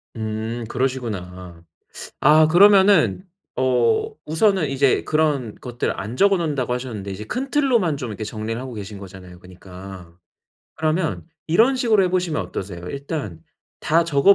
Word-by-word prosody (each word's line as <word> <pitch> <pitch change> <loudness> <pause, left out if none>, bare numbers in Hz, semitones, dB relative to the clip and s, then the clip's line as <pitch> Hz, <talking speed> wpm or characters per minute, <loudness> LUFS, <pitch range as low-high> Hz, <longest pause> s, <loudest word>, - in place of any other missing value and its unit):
음 110 +1 -4
그러시구나. 95 -10 -4 0.6
아 155 +2 +6
그러면은 195 +2 +5 0.3
어 130 - +2 0.2
우선은 165 0 +2
이제 135 -1 +2
그런 150 -8 0
것들 120 -1 -4
안 105 +5 -5
적어 200 +5 +4
놓는다고 145 -7 -1
하셨는데 115 -6 -5
이제 100 +3 -7
큰 265 - -4
틀로만 240 - +2
좀 125 -3 -5
이렇게 110 +1 -6
정리를 110 +1 -4
하고 130 -1 -7
계신 105 -1 -7
거잖아요 90 -2 -12
그니까. 90 -1 -12 0.6
그러면 160 +1 -1 0.2
이런 225 +11 +3
식으로 225 -5 +3
해 185 - +2
보시면 180 -4 0
어떠세요? 90 -3 -7
일단 140 - -5 0.4
다 165 +2 +2
적어 165 +4 +5
130 Hz, 320 characters per minute, -21 LUFS, 105-170 Hz, 0.6 s, 아